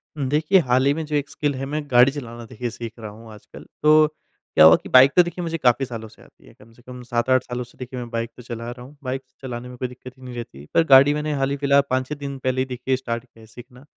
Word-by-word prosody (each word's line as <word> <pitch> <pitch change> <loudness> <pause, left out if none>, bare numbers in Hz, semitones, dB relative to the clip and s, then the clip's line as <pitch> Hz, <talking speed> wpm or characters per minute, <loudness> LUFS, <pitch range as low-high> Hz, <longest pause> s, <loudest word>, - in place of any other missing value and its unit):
हुँ, 140 -3 -2
देखिए, 155 +6 +3
हाल 130 +2 +3
ही 140 - +4
में 160 0 -4
जो 150 0 -3
एक 145 0 -1
स्किल 145 -2 -2
है 135 +1 -4
मैं 150 +2 -3
गाड़ी 125 +2 +6
चलाना 120 -5 -8
देखिए 120 +2 -5
सीख 115 0 -7
रहा 110 -2 -7
हूँ 110 +1 -13
आजकल। 105 - -14 0.2
तो 155 0 +6
क्या 150 - 0
हुआ 80 +1 +9
कि - - -9
बाइक 130 +2 +7
तो 180 - +7
देखिए 175 +1 -6
मुझे 165 0 -3
काफ़ी 130 -1 +2
सालों 115 -3 -7
से - - -20
आती - - -22
है, - - -17
कम 115 +2 -20
से 120 - -21
कम 125 0 -11
7-8 120 +2 +1
सालों 125 0 -5
से 120 - -19
देखिए 125 0 -7
मैं 120 -1 -7
बाइक 115 0 -3
तो 125 - -11
चला 115 0 -6
रहा 120 0 -10
हूँ। 145 +2 -16
बाइक 130 +1 -3 0.2
चलाने 125 -1 -6
में 125 - -11
कोई 125 - -3
दिक़्क़त 125 +1 -13
ही 130 - -17
नहीं 125 -1 -8
रहती, 75 - -9
पर 165 - +4
गाड़ी 140 +2 +8
मैंने 150 0 -2
हाल 135 - +1
ही 140 - -2
फिलहा 140 0 +3
5-6 130 +3 -1
दिन 140 -1 -6
पहले 130 0 -1
ही - - 0
देखिए 130 +1 -2
स्टार्ट 120 -2 -4
किया 115 -2 -23
है - - -14
सीखना। 125 +3 -14
130 Hz, 285 wpm, -22 LUFS, 120-140 Hz, 0.2 s, हुआ